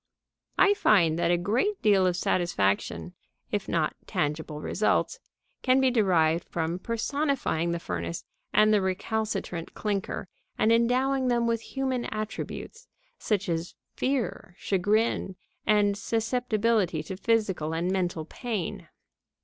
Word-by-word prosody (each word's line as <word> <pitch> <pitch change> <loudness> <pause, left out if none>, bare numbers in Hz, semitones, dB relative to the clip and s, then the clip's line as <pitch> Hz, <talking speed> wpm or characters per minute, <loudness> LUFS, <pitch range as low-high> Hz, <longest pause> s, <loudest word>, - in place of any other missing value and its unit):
I 400 - +6
find 170 - +3
that 170 - +2
a 175 - +4
great 235 - 0
deal 195 -3 +5
of 180 - +1
satisfaction, 100 - 0 0.4
if - - -2
not - - 0
tangible 150 +1 -2
results, 215 - 0 0.4
can 255 0 +4
be 265 -1 +3
derived 175 -8 +3
from 170 +1 -2
personifying 235 - -1
the 170 - -1
furnace 85 - -4 0.3
and 215 0 +5
the 210 - +4
recalcitrant 190 -2 -2
clinker, 200 -2 -2 0.3
and 220 - +3
endowing 255 +3 +2
them 240 -1 +2
with 230 -1 0
human 260 -1 -2
attributes, 220 - -5 0.3
such 205 -2 0
as 165 0 -2 0.2
fear, 255 -9 -2
chagrin, 205 0 +1 0.3
and 205 -1 +4
susceptibility 220 -5 0
to 190 - -6
physical 195 -7 0
and 175 +3 0
mental 180 -4 -1
pain. 215 -1 -4
205 Hz, 125 wpm, -27 LUFS, 175-235 Hz, 0.4 s, I